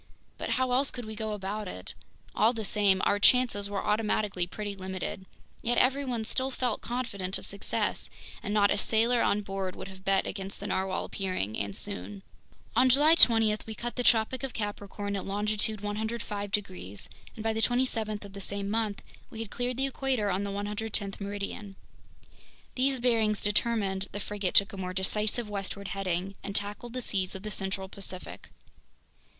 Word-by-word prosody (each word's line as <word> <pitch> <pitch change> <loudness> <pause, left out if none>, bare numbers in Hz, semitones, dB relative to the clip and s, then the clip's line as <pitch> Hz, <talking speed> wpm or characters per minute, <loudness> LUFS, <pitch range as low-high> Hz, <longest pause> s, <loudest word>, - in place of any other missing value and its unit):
But - - -3
how 260 -1 +1
else 270 +3 +3
could 245 -2 -6
we 220 0 -6
go 220 0 -2
about 205 +1 -3
it? 90 - -7 0.4
All 220 +3 +4
the 225 -2 -3
same, 195 -2 +3
our 205 - +3
chances 205 -3 +4
were 200 -1 -2
automatically 210 -4 +1
pretty 205 +2 -4
limited. 190 0 -5 0.3
Yet 240 +1 +1
everyone 255 -3 +2
still 260 +4 0
felt 250 -4 -1
confident 200 -6 -2
of - - -9
success, 200 0 -2 0.3
and 205 - -4
not 205 -1 +4
a - - +2
sailor 230 +3 +3
on 210 - +3
board 195 -2 -3
would - - -7
have 190 0 -12
bet 195 0 +3
against 195 0 -5
the 200 - -6
narwhale 190 -1 0
appearing, 185 - -2
and 100 -1 -2
soon. 95 +2 0 0.5
On 255 +3 +6
July 295 +5 +7
20 225 -8 +8
we 220 - -5
cut 240 +2 -4
the 250 - 0
Tropic 235 +1 +3
of 270 -2 -4
Capricorn 205 -1 -3
at 195 - -2
longitude 210 +1 0
105 210 -1 -3
degrees, 185 - -2 0.3
and 215 - -6
by 225 0 +1
the 220 - 0
27th 225 -4 +1
of 200 - -11
the 200 - -7
same 200 +1 -2
month, 220 -2 -1 0.3
we - - -10
had 225 -2 -5
cleared 245 0 -2
the 270 - +2
equator 265 -6 0
on 190 +2 0
the 200 - -2
110th 205 0 -3
meridian. 200 0 -5 1.0
These 265 0 +2
bearings 225 -4 +3
determined, 205 -2 +1
the 205 - -4
frigate 205 -2 -2
took 200 +1 +5
a - - -6
more 185 -1 -4
decisive 210 +4 0
westward 200 -1 -4
heading 185 0 -2
and 200 0 -5
tackled 210 +4 -1
the 255 - -2
seas 190 -4 0
of 190 - -7
the 215 - -4
central 190 -1 -2
Pacific. 190 -1 -5
205 Hz, 180 wpm, -29 LUFS, 195-225 Hz, 1.0 s, 20